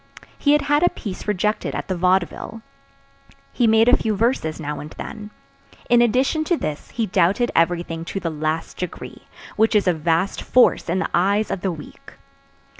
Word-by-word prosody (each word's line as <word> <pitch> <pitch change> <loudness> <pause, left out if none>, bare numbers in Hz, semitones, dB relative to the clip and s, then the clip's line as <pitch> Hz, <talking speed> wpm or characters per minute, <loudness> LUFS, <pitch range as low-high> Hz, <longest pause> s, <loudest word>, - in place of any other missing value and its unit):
He 285 - +2
had 295 - +3
had 290 +1 +2
a 355 - +4
piece 200 -1 -7
rejected 210 +1 -1
at - - -4
the 185 - -2
Vaudeville. 185 +5 -1 0.9
He 240 - +2
made 225 +1 +4
a 250 - +7
few 220 -1 -1
verses 205 -8 0
now 150 -1 -4
and 150 - -8
then. 210 -1 -7 0.6
In 240 0 +6
addition 255 +7 +2
to 345 +1 +1
this 150 - -5
he 230 - -2
doubted 190 +5 +1
everything 165 -1 0
to 195 - -4
the 170 -3 -3
last 155 +1 -3
degree, 180 - -7 0.3
which 220 +1 +3
is 205 -2 +3
a 180 - +4
vast 165 +4 0
force 250 -8 +3
in 175 - 0
the 190 - -1
eyes 200 +4 +1
of 185 - -3
the 190 - -1
weak. 155 -3 -11
195 Hz, 185 wpm, -21 LUFS, 170-230 Hz, 0.9 s, a